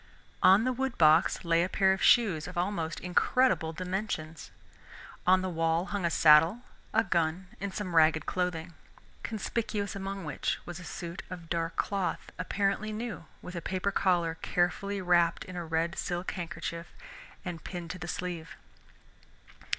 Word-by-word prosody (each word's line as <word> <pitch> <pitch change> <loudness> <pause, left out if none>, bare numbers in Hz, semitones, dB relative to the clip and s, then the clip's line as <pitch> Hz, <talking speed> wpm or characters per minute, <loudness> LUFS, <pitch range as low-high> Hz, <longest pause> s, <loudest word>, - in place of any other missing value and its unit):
On 190 +3 +7
the 255 +1 +1
wood 265 0 -2
box 160 +2 +4
lay 170 0 +3
a 180 - -1
pair 190 0 +3
of 190 - -4
shoes 190 -11 +4
of 180 0 -8
almost 175 -3 -1
incredible 180 -1 +2
dimensions. 180 -3 -4 0.8
On 185 0 +5
the - - -1
wall 165 0 +1
hung 200 -3 -1
a - - +3
saddle, 165 +9 +5 0.3
a 220 - +3
gun, 170 0 0
and 200 0 -3
some 185 -3 -4
ragged 155 -1 +5
clothing, 180 -2 -2 0.5
conspicuous 215 -1 -3
among 195 -1 -5
which 150 - -2
was 175 -1 -7
a - - -9
suit 170 +1 -6
of 170 -3 -9
dark 165 -1 -1
cloth, 195 -2 -2
apparently 200 +3 0
new, 220 -5 -5 0.2
with 180 - -8
a 170 - -3
paper 190 +3 -1
collar 170 -4 +1
carefully 190 +3 0
wrapped 175 -1 +3
in 185 - -9
a 175 - -3
red 165 +2 -1
silk 175 -1 -3
handkerchief 170 -1 -5 0.6
and 170 -3 -5
pinned 175 -2 -6
to 185 - -7
the 175 - -6
sleeve. 170 -2 -5
180 Hz, 160 wpm, -30 LUFS, 165-195 Hz, 0.8 s, On